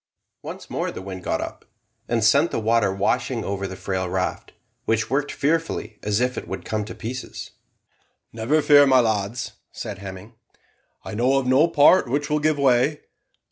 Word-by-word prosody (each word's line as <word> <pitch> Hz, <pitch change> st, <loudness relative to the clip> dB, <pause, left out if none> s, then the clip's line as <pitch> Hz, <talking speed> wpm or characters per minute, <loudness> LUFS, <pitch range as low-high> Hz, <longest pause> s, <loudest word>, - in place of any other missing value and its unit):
Once -, -, -8 dB
more -, -, -2 dB
the -, -, -7 dB
wind 95 Hz, -1 st, -8 dB
got -, -, -1 dB
up, -, -, -7 dB, 0.4 s
and 115 Hz, -2 st, 0 dB
sent 140 Hz, +9 st, +4 dB
the -, -, -2 dB
water 115 Hz, -2 st, +2 dB
washing 120 Hz, +5 st, -1 dB
over 100 Hz, 0 st, -3 dB
the 95 Hz, -, -7 dB
frail 95 Hz, -1 st, -3 dB
raft, 90 Hz, 0 st, -3 dB, 0.3 s
which 110 Hz, -1 st, 0 dB
worked 145 Hz, +2 st, 0 dB
fearfully, 150 Hz, -8 st, -1 dB
as 105 Hz, 0 st, 0 dB
if 125 Hz, +1 st, 0 dB
it -, -, -12 dB
would 95 Hz, -2 st, -6 dB
come 110 Hz, -1 st, -2 dB
to 105 Hz, -, -8 dB
pieces. 125 Hz, +3 st, -7 dB, 0.8 s
"Never 125 Hz, +8 st, +1 dB
fear, 145 Hz, -1 st, +7 dB
my 130 Hz, -1 st, +6 dB
lads," 110 Hz, +2 st, -1 dB, 0.2 s
said 105 Hz, -5 st, -7 dB
Hemming, 95 Hz, +3 st, -9 dB, 0.7 s
"I -, -, -6 dB
know 125 Hz, +5 st, +2 dB
of 135 Hz, -, 0 dB
no 130 Hz, +6 st, +4 dB
part 150 Hz, -2 st, +5 dB
which 145 Hz, +3 st, -1 dB
will 150 Hz, -, +2 dB
give 155 Hz, 0 st, +1 dB
way. 140 Hz, +2 st, +2 dB
120 Hz, 180 wpm, -23 LUFS, 100-140 Hz, 0.8 s, fear